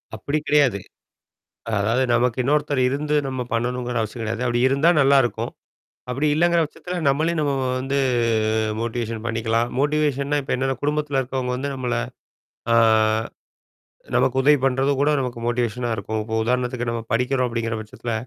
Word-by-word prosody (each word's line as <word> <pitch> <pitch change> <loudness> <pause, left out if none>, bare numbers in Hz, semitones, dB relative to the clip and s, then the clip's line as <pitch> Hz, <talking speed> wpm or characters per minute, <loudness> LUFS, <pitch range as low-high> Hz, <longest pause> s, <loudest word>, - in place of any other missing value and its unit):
அப்படி 145 +2 -2
கிடையாது. 140 -8 +3 0.9
அ - - -4
அதாவது, 115 +6 +1
நமக்கு 120 0 +1
இன்னொருத்தர் 145 +1 +1
இருந்து 150 +3 -1
நம்ம 130 -1 -4
பண்ணணுங்கிற 125 +1 -1
அவசியம் 110 +2 -5
கெடையாது. 110 +2 -3
அப்படி 120 0 0
இருந்தா 140 +5 +2
நல்லாயிருக்கும்! 135 -4 +2 0.6
அப்படி 135 +5 0
இல்லைங்கிற 170 +2 +3
பட்சத்தில, 180 +4 -7
நம்மளே 155 +5 +1
நம்ம 145 -2 +1
வ - - -1 0.2
வந்து 135 +2 -1 0.8
மோட்டிவேஷன் 115 -1 -3
பண்ணிக்கலாம். 115 0 0
மோட்டிவேஷன்னா 145 -1 +1
இப்ப 135 - -6
என்ன? 135 +1 -1
குடும்பத்தில 150 -1 0
இருக்கிறவங்க 125 -1 -3
வந்து 140 +2 -3
நம்மளை, 125 -2 -1 0.7
அ - - +5 1.4
நமக்கு 130 0 +2
உதவி 145 +2 +5
பண்ணுறதும் 135 +1 +1
கூட 145 - +3
நமக்கு 125 -3 -4
மோட்டிவேஷனா 120 0 -1
இருக்கும். 110 +1 -4
இப்ப 110 +1 -7
உதாரணத்துக்கு, 125 +1 -1
நம்ம 115 0 -3
படிக்கிறோம் 125 +2 +1
அப்படீங்கிற 115 -1 -2
பட்சத்தில, 110 +2 -6
125 Hz, 145 wpm, -22 LUFS, 120-140 Hz, 1.4 s, அ